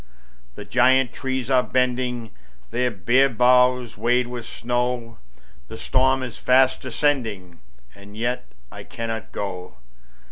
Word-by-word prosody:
The - - -9
giant 130 0 +3
trees 130 -1 -3
are 130 -1 +5
bending 125 -3 -1 0.4
Their 125 +2 0
bare 120 +7 +2
boughs 125 0 +3
weighed 125 +1 +2
with 120 -1 -7
snow, 125 +1 -1
And 115 -1 -12 0.5
the 110 - -9
storm 130 +2 +1
is 125 -2 -7
fast 130 +1 +3
descending 115 - -2 0.3
And 100 +1 -14
yet 125 +2 -2 0.2
I - - -9
cannot 115 -1 -6
go. 90 -8 -6
125 Hz, 130 wpm, -23 LUFS, 115-130 Hz, 0.5 s, are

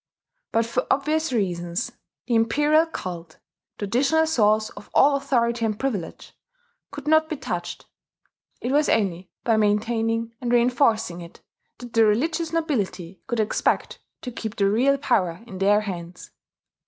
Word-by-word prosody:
But 230 0 +2
for 250 +2 -2
obvious 310 +2 +1
reasons 175 -2 -2 0.3
the 240 - -2
Imperial 295 +8 +3
cult 175 - -7 0.4
traditional 275 +10 +2
source 215 -7 +2
of 205 - -13
all 280 +1 +6
authority 240 -4 0
and 215 -1 -1
privilege 215 -11 -4 0.5
could 285 0 -9
not 315 0 +4
be 310 - -3
touched: - - -5 0.8
it 245 - -2
was 295 +2 +3
only 185 -4 0
by 225 -2 +2
maintaining 225 +2 0
and 240 -1 -2
reinforcing 235 -7 +2
it 170 0 -12 0.4
that 245 -2 -11
the 225 - +5
religious 315 +10 +1
nobility 200 - -2
could 240 -3 -2
expect 215 0 0 0.2
to 250 - -6
keep 225 -2 -6
the 200 - +2
real 265 +6 +3
power 200 -9 0
in 190 -5 -9
their 205 +2 +4
hands. 180 -3 -7
230 Hz, 140 wpm, -24 LUFS, 205-275 Hz, 0.8 s, all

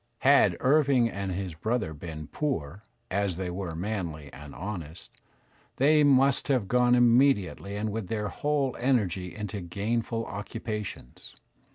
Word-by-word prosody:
Had 140 +1 +5
Irving 135 -4 +3
and 100 -1 -4
his 90 -1 -4
brother 110 +1 -2
been 75 0 -7
poor, 100 - -3 0.3
as 100 -2 0
they 90 -1 -3
were 90 -2 -4
manly 85 -6 -4
and 75 0 -11
honest, 85 -3 -7 0.6
they 150 +3 +4
must 135 -1 +4
have 130 -8 +1
gone 125 +2 +4
iounediately 120 -5 +3
and 110 0 -2
with 110 -3 -4
their' 105 +1 -2
whole 145 -3 -1
energy 100 -8 0
into 105 -2 -5
gainful 115 +6 -2
occupations. 105 - -6
105 Hz, 135 wpm, -28 LUFS, 90-125 Hz, 0.6 s, Had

